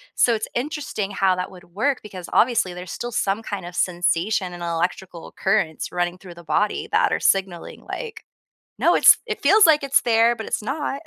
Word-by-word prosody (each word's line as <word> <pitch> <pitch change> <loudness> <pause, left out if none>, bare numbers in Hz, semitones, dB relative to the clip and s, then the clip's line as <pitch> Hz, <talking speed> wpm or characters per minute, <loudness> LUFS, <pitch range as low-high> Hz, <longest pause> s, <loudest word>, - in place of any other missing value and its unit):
So 240 - +3
it's 220 - -4
interesting 255 -7 -3
how 190 -1 +2
that 180 0 -4
would 180 -2 -14
work 270 +5 0
because, 185 -4 -9
obviously, 230 -7 +2
there's 180 0 -8
still 240 - -5
some 205 0 -1
kind 205 -4 -5
of 175 0 -9
sensation 180 +2 0
and 175 0 -8
electrical 170 +1 -3
occurrence 190 -6 -1
running 175 0 -2
through 185 -2 -12
the 170 - -13
body 210 +5 -1
that - - +2
are - - 0
signaling 190 -3 -1
like, 445 -2 -7 0.5
"No, - - +3
it's - - +7
it 435 -2 -4
feels 425 +2 +6
like 305 -2 +4
it's 275 0 +3
there, 230 0 +3
but 220 - -6
it's - - -2
not." 275 +3 -3
200 Hz, 195 wpm, -22 LUFS, 180-240 Hz, 0.5 s, it's